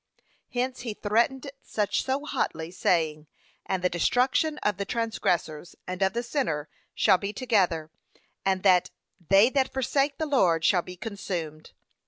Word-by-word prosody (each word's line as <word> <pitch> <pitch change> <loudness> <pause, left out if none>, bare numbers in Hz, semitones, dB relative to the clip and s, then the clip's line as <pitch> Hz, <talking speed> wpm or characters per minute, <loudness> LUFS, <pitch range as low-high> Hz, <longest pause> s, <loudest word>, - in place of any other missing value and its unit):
Hence 255 +1 -2
he 230 -3 -5
threateneth 240 +7 0
such 210 -2 -1
so 270 +2 -2
hotly, 160 - -2
saying, 160 -4 0 0.4
'And 190 -2 -1
the - - +5
destruction 255 - +1
of 210 -3 +1
the 200 - -2
transgressors 180 -8 -2
and 185 +1 -5
of 190 0 +2
the 235 +1 -2
sinner 235 - -2 0.3
shall 190 -4 +4
be 200 0 -3
together,' 185 -10 0 0.5
and 190 -1 0
that 185 -3 +4 0.4
'they 200 +6 +6
that 265 -1 +1
forsake 275 +2 0
the 315 - -1
Lord 180 - +2
shall 180 +1 +4
be 180 +1 -10
consumed.' 175 -7 -5
200 Hz, 150 wpm, -27 LUFS, 175-250 Hz, 0.5 s, they